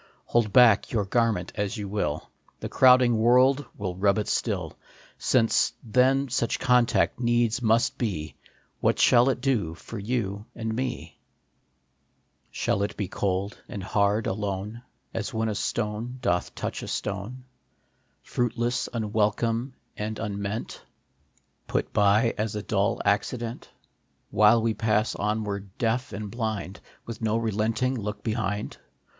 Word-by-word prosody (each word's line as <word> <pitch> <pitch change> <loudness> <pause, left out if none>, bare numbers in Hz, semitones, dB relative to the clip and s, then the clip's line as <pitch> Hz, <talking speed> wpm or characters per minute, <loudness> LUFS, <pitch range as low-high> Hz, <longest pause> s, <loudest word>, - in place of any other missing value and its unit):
Hold 115 -3 +1
back 120 -2 +5
your 105 -4 0
garment 110 -4 0
as 105 +3 -2
you 105 -1 -4
will, 100 -7 -3 0.3
The - - -5
crowding 125 -3 +5
world 130 +4 +4
will 95 -4 -3
rub 100 +2 +2
it 105 - -1
still. - - -1 0.6
Then, 115 -3 +5
since - - +1 0.6
such 120 -2 0
contact 125 -2 +2
needs 120 -1 +1
must 115 0 +2
be, 90 -10 -2 0.5
What - - +2
shall 125 +1 +5
it 125 -2 -1
do 110 -12 0
for 115 +5 -8
you 105 -2 -3
and 115 -1 -3
me? 125 0 -4 1.3
Shall 100 - -1
it 100 - -2
be 100 - -2
cold 100 +1 -2
and 100 - -6
hard 100 +3 +1
alone, 100 +3 -3 0.3
As 115 +2 -4
when 110 0 0
a - - -1
stone 110 +4 -3
doth 90 -8 -1
touch - - -4
a - - -7
stone, 105 +6 -4
CONTACT. - - -29 0.8
Fruitless, 120 0 -1
unwelcome, 115 +3 0 0.2
and 110 +1 -4
unmeant, 100 0 -4 0.9
Put - - -2
by 105 +3 +4
as 110 0 -1
a 105 - -3
dull 100 -1 0
accident, 115 +3 -1 0.6
While 110 +2 +5
we 115 -1 +1
pass 110 0 +1
onward, 100 -2 -3
deaf 125 +4 0
and 105 -1 -6
blind, 110 -5 -3 0.3
With 115 -1 -7
no 110 0 +1
relenting 115 +3 0
look 105 -4 -5
behind 105 -2 -2
110 Hz, 140 wpm, -26 LUFS, 100-120 Hz, 1.3 s, back